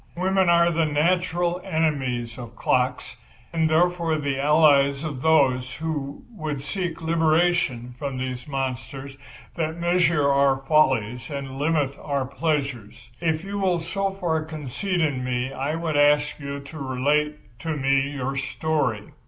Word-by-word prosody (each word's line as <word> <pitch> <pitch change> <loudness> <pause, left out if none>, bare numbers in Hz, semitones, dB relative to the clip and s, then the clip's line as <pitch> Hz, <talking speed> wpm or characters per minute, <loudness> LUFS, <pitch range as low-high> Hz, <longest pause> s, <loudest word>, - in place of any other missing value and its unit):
Women 190 0 +2
are 170 0 +5
the 165 -1 +1
natural 175 +3 +1
enemies 135 - -1
of 120 -1 -9
clocks, 125 +1 0 0.4
and, 160 -1 +2
therefore, 170 0 +2
the 140 -2 -2
allies 140 -1 +4
of 145 -5 -4
those 130 -5 +3
who 150 -3 -4
would 155 - -4
seek 165 +3 -4
liberation 160 -6 +1
from 140 -2 -3
these 130 0 -4
monsters 135 0 -4 0.4
that 160 -1 -2
measure 170 -3 +2
our 140 -1 +3
follies 130 -5 +1
and 135 -2 -5
limit 145 -2 0
our 140 -2 -1
pleasures. 135 -6 -3
If 160 -1 0
you 200 +1 -4
will 185 -3 +2
so 190 +4 -2
far 175 -5 -1
confide 160 +4 -3
in 140 -5 0
me 125 +1 -2
I 140 +4 -2
would 165 -2 -2
ask 145 +1 +3
you 140 0 -5
to 140 +3 -10
relate 140 -1 -1
to 160 +1 -3
me 135 0 +2
your 135 -1 -3
story." 140 -6 -1
150 Hz, 145 wpm, -24 LUFS, 135-165 Hz, 0.4 s, are